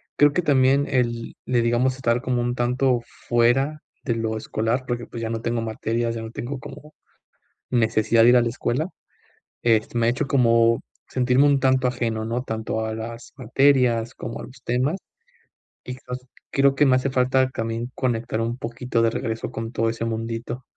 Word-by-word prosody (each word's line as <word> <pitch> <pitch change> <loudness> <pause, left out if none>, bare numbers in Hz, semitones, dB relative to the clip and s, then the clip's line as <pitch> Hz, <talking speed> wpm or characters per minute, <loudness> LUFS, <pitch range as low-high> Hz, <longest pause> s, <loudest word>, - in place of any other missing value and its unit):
creo 145 0 +5
que 180 - +1
también 140 -2 +3
el 120 -3 -1
le 120 -2 +2
digamos 125 +3 +1
estar 120 -1 +1
como 125 -1 0
un 120 0 -1
tanto 125 0 +1 0.3
fuera 135 +6 +2 0.2
de 115 - 0
lo 110 -1 -2
escolar, 115 +4 -1
porque, 120 -1 -2
pues, 115 - -8
ya 115 - -2
no 115 0 -3
tengo 115 0 -1
materias, 115 +1 -2
ya 115 - -4
no 110 0 -7
tengo 130 +3 -5
como 150 +4 -11 0.8
necesidad 115 -1 +3
de - - +7
ir 125 - +6
a 120 - +5
la 120 - 0
escuela. 130 +6 -1 0.7
Este, 115 0 +1
me 115 0 +2
ha - - +5
hecho 135 +4 -1
como 115 -3 +3 0.3
sentirme 130 +2 +3
un 140 -2 +3
tanto 130 -1 +3
ajeno, 115 -3 -2
¿no?, 120 +3 -2
tanto 110 -1 -3
a 110 - -3
las 115 +1 -7
materias, 125 -2 +2
como 115 - -6
a - - -8
los 125 -1 -13
temas, 130 +9 0 0.9
y 125 - -6
los 125 0 -4 0.3
creo 135 0 +3
que 145 - +4
me 130 -1 +5
hace 135 +1 -1
falta 130 0 +2
también 115 0 -3
conectar 115 -3 -1
un 115 +2 -2
poquito 120 0 -2
de 115 - +4
regreso 115 0 -3
con 115 +1 -5
todo 115 -2 0
ese 115 0 -3
mundito. 115 +2 -4
120 Hz, 190 wpm, -23 LUFS, 115-130 Hz, 0.9 s, de